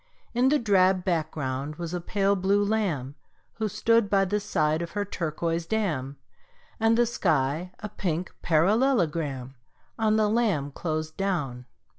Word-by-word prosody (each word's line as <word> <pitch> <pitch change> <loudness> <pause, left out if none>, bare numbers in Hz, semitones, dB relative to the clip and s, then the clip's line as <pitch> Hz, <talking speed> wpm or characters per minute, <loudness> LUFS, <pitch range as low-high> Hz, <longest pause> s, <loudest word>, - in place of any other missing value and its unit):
In 250 +2 +3
the 300 - +4
drab 190 -5 +3
background 150 -5 -2
was 170 +1 -5
a 175 - -2
pale 200 +2 +1
blue 200 +2 +2
lamb 180 -12 -1 0.5
Who 220 - +1
stood 230 +1 +2
by 195 -1 +3
the 205 +3 0
side 155 -5 0
of 170 - -5
her 205 0 -1
turquoise 165 -2 -2
dam, 150 -11 -1 0.6
And 225 +1 +3
the 240 - +4
sky 160 - 0
a 210 - -5
pink 175 -3 -3
parallelogram 165 - +1 0.5
On 215 -1 +3
the 215 -1 +3
lamb 205 -11 +1
closed 155 +1 -4
down. 145 -11 -2
180 Hz, 145 wpm, -26 LUFS, 155-210 Hz, 0.6 s, the